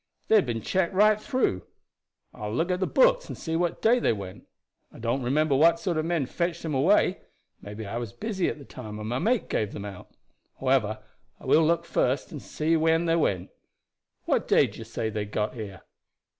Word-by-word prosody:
They 220 Hz, -, +6 dB
had 200 Hz, -11 st, +4 dB
been 115 Hz, -2 st, -3 dB
checked 190 Hz, 0 st, 0 dB
right 215 Hz, +2 st, +4 dB
through. 245 Hz, -, 0 dB, 0.7 s
I 105 Hz, -, -6 dB
will 105 Hz, -, -3 dB
look 170 Hz, +7 st, 0 dB
at 180 Hz, -, 0 dB
the 185 Hz, -, 0 dB
books -, -, +3 dB
and -, -, -6 dB
see 160 Hz, -1 st, -3 dB
what 175 Hz, 0 st, -1 dB
day 240 Hz, +3 st, +5 dB
they 235 Hz, -, +2 dB
went. 100 Hz, -3 st, -8 dB, 0.4 s
I -, -, -14 dB
don't 120 Hz, +4 st, -1 dB
remember 140 Hz, +4 st, +1 dB
what 165 Hz, +4 st, +5 dB
sort 180 Hz, -2 st, -1 dB
of 155 Hz, -, 0 dB
men 165 Hz, -4 st, 0 dB
fetched 170 Hz, +5 st, -3 dB
them 160 Hz, -2 st, -3 dB
away. 180 Hz, +7 st, +3 dB, 0.4 s
Maybe 105 Hz, +2 st, -7 dB
I 100 Hz, +4 st, -4 dB
was 120 Hz, -3 st, -4 dB
busy 205 Hz, -, -2 dB
at -, -, -5 dB
the 140 Hz, -, -12 dB
time, 110 Hz, -4 st, -8 dB
and 105 Hz, 0 st, -6 dB
my 125 Hz, +2 st, -1 dB
mate 230 Hz, -, +1 dB
gave 105 Hz, -2 st, -1 dB
them 100 Hz, -, -6 dB
out. 100 Hz, -3 st, -9 dB, 0.5 s
However, -, -, +1 dB, 0.4 s
I -, -, -14 dB
will 160 Hz, -, +5 dB
look 170 Hz, +1 st, +1 dB
first 130 Hz, -2 st, 0 dB
and 150 Hz, -5 st, -7 dB
see 160 Hz, +2 st, 0 dB
when 165 Hz, +1 st, +2 dB
they 165 Hz, 0 st, +2 dB
went. 95 Hz, -, 0 dB, 0.7 s
What -, -, 0 dB
day -, -, +5 dB
do -, -, -9 dB
you 115 Hz, -, -7 dB
say 110 Hz, -1 st, -3 dB
they 105 Hz, -1 st, -3 dB
got 105 Hz, +1 st, -2 dB
here?" 100 Hz, -5 st, -8 dB
155 Hz, 215 wpm, -26 LUFS, 110-175 Hz, 0.7 s, They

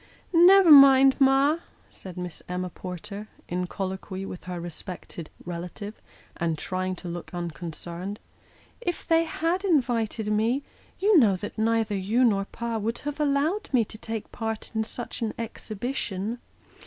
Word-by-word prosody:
" -, -, -33 dB
Never 355 Hz, +1 st, +8 dB
mind, 270 Hz, -2 st, +9 dB
ma," 275 Hz, +4 st, +4 dB, 0.3 s
said 185 Hz, -2 st, -10 dB
Miss 180 Hz, -2 st, -6 dB
Emma 180 Hz, 0 st, -3 dB
Porter, 200 Hz, +5 st, -7 dB, 0.2 s
in 180 Hz, +1 st, -2 dB
colloquy 190 Hz, +1 st, -4 dB
with 180 Hz, -, -8 dB
her 180 Hz, -1 st, -4 dB
respected 170 Hz, -1 st, -8 dB, 0.2 s
relative, 180 Hz, +5 st, -6 dB, 0.4 s
and 165 Hz, -2 st, -1 dB
trying 185 Hz, +2 st, -2 dB
to 180 Hz, -, -9 dB
look 175 Hz, 0 st, -6 dB
unconcerned; 175 Hz, +3 st, -5 dB, 0.6 s
"if 350 Hz, -7 st, -3 dB
they 330 Hz, 0 st, +4 dB
had 335 Hz, +4 st, -1 dB
invited 235 Hz, -, +1 dB
me, 230 Hz, +6 st, +1 dB, 0.3 s
you 405 Hz, -3 st, +5 dB
know 210 Hz, -7 st, +5 dB
that 205 Hz, +3 st, -6 dB
neither 220 Hz, -1 st, +1 dB
you 210 Hz, +6 st, +1 dB
nor 200 Hz, -5 st, +3 dB
pa 230 Hz, +1 st, -4 dB
would 225 Hz, +3 st, -2 dB
have 295 Hz, 0 st, -3 dB
allowed 300 Hz, +7 st, +1 dB
me 245 Hz, -5 st, +3 dB
to 220 Hz, -, -11 dB
take 225 Hz, -2 st, -5 dB
part 225 Hz, -1 st, -4 dB
in 220 Hz, 0 st, +1 dB
such 240 Hz, +2 st, -6 dB
an 225 Hz, -2 st, -2 dB
exhibition." 225 Hz, -1 st, -4 dB
220 Hz, 150 wpm, -26 LUFS, 185-270 Hz, 0.6 s, mind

